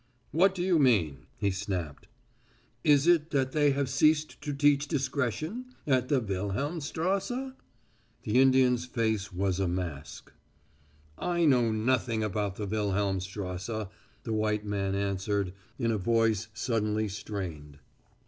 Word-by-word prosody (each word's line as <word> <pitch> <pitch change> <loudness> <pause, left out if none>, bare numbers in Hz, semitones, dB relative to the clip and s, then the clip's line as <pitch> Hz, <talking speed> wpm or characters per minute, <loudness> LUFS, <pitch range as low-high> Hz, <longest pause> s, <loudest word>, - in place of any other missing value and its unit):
"What 190 +5 +4
do 175 - -2
you 180 -3 +3
mean?" 100 - +2
he 100 - +1
snapped. 95 -6 -4 0.8
"Is 145 -1 +5
it 170 -2 +4
that 135 -3 0
they 145 0 +3
have 140 0 0
ceased 150 +4 +2
to 150 -1 -3
teach 145 0 +3
discretion 150 - -2
at 130 -3 +2
the 140 - +3
Wilhelmstrasse?" 160 - -2 0.7
The 115 +4 +3
Indian's 130 -2 +4
face 110 -4 -1
was 95 0 -1
a 95 - +1
mask. 85 -5 -5 0.9
"I 170 -1 +1
know 125 -6 +4
nothing 110 0 +1
about 105 -1 -2
the 105 - -4
Wilhelmstrasse," 100 0 -2 0.3
the 115 - -3
white 105 -1 0
man 100 -1 -1
answered, 100 -1 -1 0.2
in 115 -3 0
a 110 - 0
voice 110 0 +2
suddenly 110 -1 0
strained. 95 -8 -6
110 Hz, 130 wpm, -29 LUFS, 100-140 Hz, 0.9 s, Is